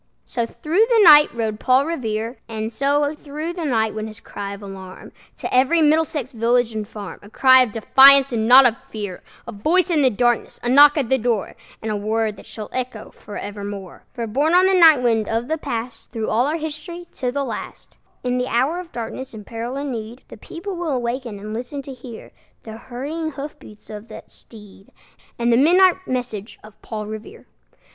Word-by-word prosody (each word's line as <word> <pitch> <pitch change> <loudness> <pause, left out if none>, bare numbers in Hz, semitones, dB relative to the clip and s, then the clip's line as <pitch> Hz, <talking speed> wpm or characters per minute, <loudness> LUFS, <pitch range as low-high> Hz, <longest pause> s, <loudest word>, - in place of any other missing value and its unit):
So 235 -2 -3
through 330 - +1
the 455 -3 +5
night 300 -4 +8
rode 220 -2 -3
Paul 260 +2 +3
Revere; 230 -6 -3
And 220 0 -4
so 285 +3 +1
through 305 +2 -6
the 345 -2 -5
night 220 -6 0
went 215 0 -4
his 215 0 -11
cry 200 -2 -7
of 200 - -13
alarm 190 -1 -10 0.3
To - - -5
every 265 +7 +3
Middlesex 305 -3 +1
village 235 0 +1
and 215 -1 -4
farm, 205 -3 -9
A 205 - -14
cry 260 +3 +6
of 250 -4 +1
defiance 270 +5 +6
and 225 -2 -1
not 260 +2 +8
of 235 -2 +3
fear, 205 -4 -6 0.3
A - - -5
voice 340 - +1
in 310 -3 +3
the 265 - +5
darkness, 240 +1 0
a 240 - -1
knock 290 +3 +7
at 270 -6 -1
the 265 - +2
door, 230 -3 -1 0.3
And 220 - -2
a - - -1
word 215 +1 -1
that - - -14
shall 215 -2 -7
echo 255 -4 -5
forevermore! 205 -2 -8
For, 235 -2 -5
borne 285 +10 +1
on 365 +1 +6
the 380 - +3
night 320 -8 +6
wind 225 -3 +1
of 230 +2 -1
the 315 +1 -2
Past, 230 -3 -6
Through 225 -2 -4
all 240 +5 +2
our 310 +3 -1
history, 315 +3 -7
to 250 -1 -3
the 280 +2 -2
last, - - -8 0.3
In 250 0 -1
the 250 - -1
hour 265 +9 0
of 360 -2 -9
darkness 240 +2 -6
and 210 -2 -10
peril 235 +3 -5
and 280 0 -4
need, 230 +1 -7
The - - -11
people 370 +3 -7
will 315 -7 -1
waken 240 -2 -4
and 210 +2 -7
listen 250 +5 -5
to 270 - -8
hear 245 -2 -11 0.3
The 220 - -9
hurrying 285 +7 -5
hoof 285 +2 -8
beats 210 0 -15
of 210 +1 -9
that - - -12
steed, 205 -3 -16 0.5
And 235 0 +1
the - - +4
midnight 365 +6 +4
message 245 -5 -4
of 215 0 -16
Paul 215 -2 -6
Revere. 220 - -9
245 Hz, 205 wpm, -21 LUFS, 220-290 Hz, 0.5 s, night